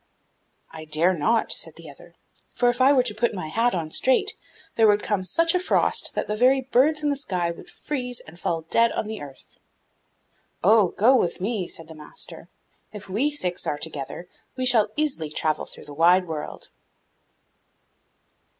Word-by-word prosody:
'I 160 Hz, -1 st, -9 dB
dare 160 Hz, +4 st, +2 dB
not,' 220 Hz, +8 st, +1 dB
said -, -, -3 dB
the -, -, -12 dB
other, -, -, -14 dB, 0.4 s
'for 245 Hz, -1 st, +3 dB
if 245 Hz, +1 st, -5 dB
I 265 Hz, +2 st, +6 dB
were 265 Hz, -3 st, +4 dB
to 235 Hz, -4 st, -1 dB
put 225 Hz, +1 st, -1 dB
my 160 Hz, -5 st, -5 dB
hat 230 Hz, +7 st, +1 dB
on 160 Hz, -3 st, -4 dB
straight, 260 Hz, +8 st, +2 dB, 0.4 s
there 225 Hz, -1 st, +5 dB
would 205 Hz, 0 st, +3 dB
come 205 Hz, -3 st, -1 dB
such 330 Hz, -, +1 dB
a 365 Hz, -, +2 dB
frost 365 Hz, -, 0 dB
that -, -, -1 dB
the 210 Hz, -, -2 dB
very 255 Hz, +4 st, +4 dB
birds 270 Hz, +4 st, +2 dB
in 295 Hz, -, +2 dB
the -, -, 0 dB
sky 180 Hz, -, -2 dB
would 170 Hz, -, -12 dB
freeze 250 Hz, -4 st, -4 dB
and 165 Hz, +2 st, -14 dB
fall 165 Hz, -2 st, -2 dB
dead 230 Hz, +8 st, +2 dB
on -, -, -2 dB
the 215 Hz, 0 st, -6 dB
earth.' 140 Hz, -2 st, -13 dB, 1.1 s
'Oh, 210 Hz, +1 st, +5 dB
go 245 Hz, +6 st, +5 dB
with 180 Hz, -8 st, 0 dB
me,' 195 Hz, -1 st, -2 dB
said 165 Hz, -, -5 dB
the 160 Hz, -, -10 dB
master; 150 Hz, -1 st, -6 dB, 0.4 s
'if 205 Hz, -2 st, -9 dB
we 230 Hz, +10 st, +1 dB
six 180 Hz, -12 st, -2 dB
are 145 Hz, -, -1 dB
together, 150 Hz, +2 st, -5 dB, 0.3 s
we 255 Hz, -1 st, -2 dB
shall 235 Hz, -4 st, +4 dB
easily 285 Hz, -, -1 dB
travel 155 Hz, 0 st, -1 dB
through -, -, -12 dB
the 145 Hz, -, -10 dB
wide 175 Hz, +4 st, +4 dB
world. 155 Hz, -2 st, -6 dB
210 Hz, 185 wpm, -24 LUFS, 165-250 Hz, 1.1 s, I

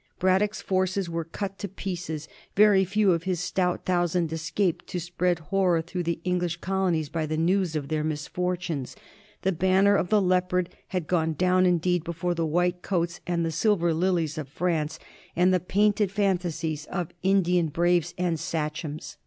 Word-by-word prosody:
Braddock's 200 Hz, +3 st, +1 dB
forces 185 Hz, -1 st, 0 dB
were 165 Hz, 0 st, -2 dB
cut 195 Hz, +4 st, -6 dB
to 200 Hz, -, -3 dB
pieces: 175 Hz, -5 st, -5 dB, 0.3 s
very 205 Hz, -1 st, +6 dB
few 200 Hz, +1 st, +3 dB
of 165 Hz, -2 st, +1 dB
his 185 Hz, -3 st, -1 dB
stout 180 Hz, 0 st, -1 dB
thousand 175 Hz, -2 st, +1 dB
escaped 170 Hz, +3 st, -1 dB
to 180 Hz, -, -3 dB
spread 175 Hz, +1 st, 0 dB
horror 175 Hz, +1 st, +1 dB
through 175 Hz, +2 st, -4 dB
the 170 Hz, -1 st, -2 dB
Eng 180 Hz, 0 st, +1 dB
lish 175 Hz, -1 st, -2 dB
colonies 180 Hz, -4 st, 0 dB
by 155 Hz, +1 st, -2 dB
the 155 Hz, +1 st, -2 dB
news 175 Hz, 0 st, +1 dB
of 145 Hz, -3 st, -2 dB
their 155 Hz, +1 st, -1 dB
misfortunes. 160 Hz, -1 st, -3 dB, 0.5 s
The 190 Hz, -, +2 dB
ban 190 Hz, +2 st, +2 dB
ner 200 Hz, 0 st, +5 dB
of 180 Hz, -, 0 dB
the 215 Hz, -, +4 dB
Leopard 180 Hz, -1 st, +1 dB, 0.2 s
had 180 Hz, -4 st, -2 dB
gone 160 Hz, -1 st, +1 dB
down 185 Hz, +3 st, +3 dB
indeed 180 Hz, -1 st, +1 dB
before 170 Hz, +1 st, -2 dB
the 165 Hz, -1 st, -1 dB
white 175 Hz, +2 st, +1 dB
coats 170 Hz, -2 st, -1 dB
and 170 Hz, -1 st, 0 dB
the 165 Hz, -, -1 dB
Silver 170 Hz, 0 st, +2 dB
Lilies 165 Hz, -2 st, 0 dB
of 150 Hz, -, -5 dB
France 160 Hz, -1 st, -1 dB, 0.4 s
and 180 Hz, +2 st, +4 dB
the 185 Hz, -, +3 dB
painted 205 Hz, +2 st, +2 dB
fan 195 Hz, -2 st, +2 dB
tasies 160 Hz, -3 st, -4 dB
of 175 Hz, -4 st, -3 dB
Indian 180 Hz, -3 st, +3 dB
braves 175 Hz, +2 st, +1 dB
and 175 Hz, -3 st, 0 dB
sachems. 155 Hz, -1 st, -4 dB
175 Hz, 175 wpm, -26 LUFS, 165-185 Hz, 0.5 s, very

